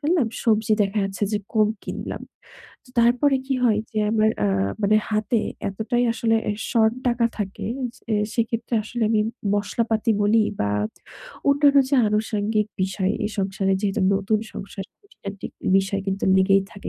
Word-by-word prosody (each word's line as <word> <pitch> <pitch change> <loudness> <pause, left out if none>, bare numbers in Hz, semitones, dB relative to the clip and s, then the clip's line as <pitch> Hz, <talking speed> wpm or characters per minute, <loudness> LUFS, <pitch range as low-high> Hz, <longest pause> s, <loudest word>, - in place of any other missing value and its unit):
ফেললাম 305 -4 +2 0.2
সবজি 220 -1 +2
দেখা 200 +2 -1
যাচ্ছে 195 +1 -2
যে 210 - +1 0.2
কম 215 -1 +4
কিনলাম। - - -6 0.6
তো - - -22
তারপরে 250 +4 +3
কি 270 - 0
হয় 215 -3 +3
যে 215 - -3
আমার 220 0 +3 0.2
আ - - +2 0.3
মানে 210 +2 +4
হাতে 215 +2 +1 0.3
এতটাই 230 +5 -1
আসলে 225 -1 +1
এ - - 0 0.2
শর্ট 220 -1 +3 0.2
টাকা 235 -1 +1
থাকে। 200 0 -4 0.3
যে 225 -4 -4 0.2
সেক্ষেত্রে 230 0 -1
আসলে 235 +1 -4
আমি 215 -2 +3 0.3
মশলাপাতি 220 +2 0
বলি 215 +2 +4 0.2
বা 100 - +1 0.8
অন্যান্য 285 0 +5
যে - - +3
আনুষঙ্গিক 210 0 0 0.2
বিষয় 190 +1 0
এই 210 - -1
সংসারে 195 0 0
যেহেতু 200 -2 -1
নতুন 205 +2 +1 0.2
সংসার 195 0 -7 0.2
খুটিনাটি 200 - -9 0.3
বিষয় 195 +1 -1
কিন্তু 195 0 -1
লেগেই 195 +1 +4
থাকে। 200 - -8
215 Hz, 155 wpm, -23 LUFS, 200-230 Hz, 0.8 s, অন্যান্য